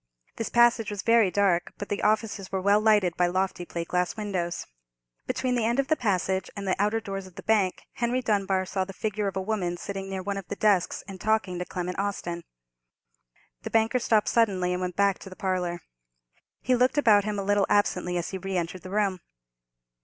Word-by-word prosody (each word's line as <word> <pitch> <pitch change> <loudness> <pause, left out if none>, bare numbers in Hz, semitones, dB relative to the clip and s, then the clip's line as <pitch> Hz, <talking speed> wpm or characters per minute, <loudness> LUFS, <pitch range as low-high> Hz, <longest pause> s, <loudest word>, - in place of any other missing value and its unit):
This 225 - -3
passage 235 -2 +4
was 205 -1 -4
very 230 -4 +5
dark; 180 -3 +1
but 205 - -6
the 205 - -2
offices 210 -2 0
were 190 - 0
well 200 +2 +3
lighted 210 -6 +3
by 180 - +3
lofty 185 0 -1
plate 170 -1 -5
glass 180 +3 0
windows. 185 -5 -3 0.6
Between 255 -1 -1
the 240 -2 +1
end 240 +3 +1
of 275 +1 0
the 310 - +4
passage 190 - 0
and 200 -1 -5
the 185 - +2
outer 210 +2 +2
doors 195 -3 -6
of 180 - -17
the - - -9
bank, 205 -4 +1
Henry 240 +1 0
Dunbar 195 -4 +1
saw 190 0 -1
the 195 +1 -8
figure 210 +1 -2
of 195 - -3
a - - 0
woman 190 -4 -2
sitting 195 +1 -5
near 190 -1 -4
one 200 +1 -2
of 195 - -7
the - - -4
desks 200 -4 +2
and 190 -2 -9
talking 215 -5 0
to 180 - -3
Clement 180 +1 -4
Austin. 175 -4 -3 1.2
The - - -5
banker 225 +3 +2
stopped 220 -3 +2
suddenly, 190 -6 +2
and 180 - -2
went 180 -1 -3
back 200 -1 +2
to 195 - -10
the 185 - -11
parlour. 180 -3 -2 0.8
He 255 - +1
looked 250 +3 +3
about 215 -8 +5
him 210 0 -2
a 200 - -2
little 205 0 +2
absently 180 -3 +1
as 170 - -3
he 190 - -4
re 195 0 -3
entered 175 +1 -3
the 185 - -9
room. 200 -2 0
195 Hz, 215 wpm, -27 LUFS, 185-215 Hz, 1.2 s, very